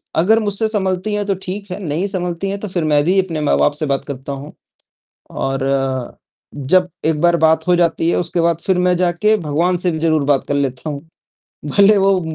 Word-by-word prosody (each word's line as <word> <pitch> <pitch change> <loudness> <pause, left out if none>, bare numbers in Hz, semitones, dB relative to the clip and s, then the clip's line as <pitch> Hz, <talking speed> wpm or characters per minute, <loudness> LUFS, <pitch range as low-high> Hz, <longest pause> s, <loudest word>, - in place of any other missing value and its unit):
अगर 210 +8 +4
मुझसे 210 +1 0
सँभलती 190 -1 -1
है 210 0 0
तो 195 -1 0
ठीक 195 +1 -6
है, 180 - -4
नहीं 160 +3 -2
संभलती 180 -1 -3
है 200 - -3
तो 210 - -6
फिर 180 -3 -2
मैं 150 -2 +2
भी 185 +4 +2
अपने 165 -5 -4
माँ-बाप 145 0 +2
से 155 - -1
बात 140 -1 -1
करता 140 -1 -6
हूँ 140 +2 -9 0.9
और 135 0 -1 0.9
जब 180 +6 +2 0.2
एक 160 -1 +1
बार 175 0 +4
बात 160 +1 +2
हो 180 - +4
जाती 170 -1 +1
है, - - +1
उसके 170 0 -1
बाद 170 -1 +2
फिर 190 -2 +2
मैं 180 0 +2
जाके 180 +4 +2
भगवान 170 +2 0
से 180 0 0
भी 160 - -3
ज़रूर 155 -2 +1
बात 140 -2 +1
कर - - -1
लेता 140 +1 -2
हूँ। 145 -1 -5 0.8
भले 200 +1 +6
वो 195 -1 +3
175 Hz, 210 wpm, -18 LUFS, 150-190 Hz, 0.9 s, भले